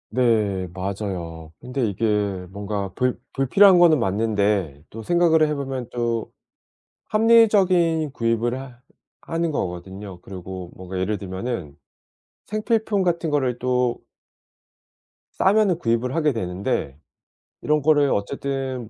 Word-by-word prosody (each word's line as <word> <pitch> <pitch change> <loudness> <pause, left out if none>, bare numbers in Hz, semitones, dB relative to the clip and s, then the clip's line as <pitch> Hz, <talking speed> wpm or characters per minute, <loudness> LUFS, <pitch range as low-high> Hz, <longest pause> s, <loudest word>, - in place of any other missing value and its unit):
네, 110 -6 +1
맞아요. 90 -4 -5
근데 125 0 -2
이게 100 -2 -1
뭔가 100 -1 -4
불 125 0 0
불필요한 185 +8 +5
거는 170 -3 +6
맞는데 100 - 0
또 110 +1 -9
생각을 165 0 +3
해보면 135 -4 -3
또 120 -2 -2 0.8
합리적인 195 -8 +4
구입을 115 0 0
하 125 -3 -11 0.4
하는 165 0 -2
거거든요. 95 - -5
그리고 95 -1 -8
뭔가 95 0 -7
예를 100 +3 -1
들면은 95 - -5 0.7
생필품 215 -1 0
같은 170 -2 0
거를 130 -4 0
또 125 -1 0 1.4
싸면은 200 -2 +3
구입을 120 -2 0
하게 155 -3 +2
되는데, 90 - -3 0.6
이런 150 0 +1
거를 145 -1 +4
어쨌든 130 +2 -3
120 Hz, 250 characters per minute, -23 LUFS, 100-155 Hz, 1.4 s, 거는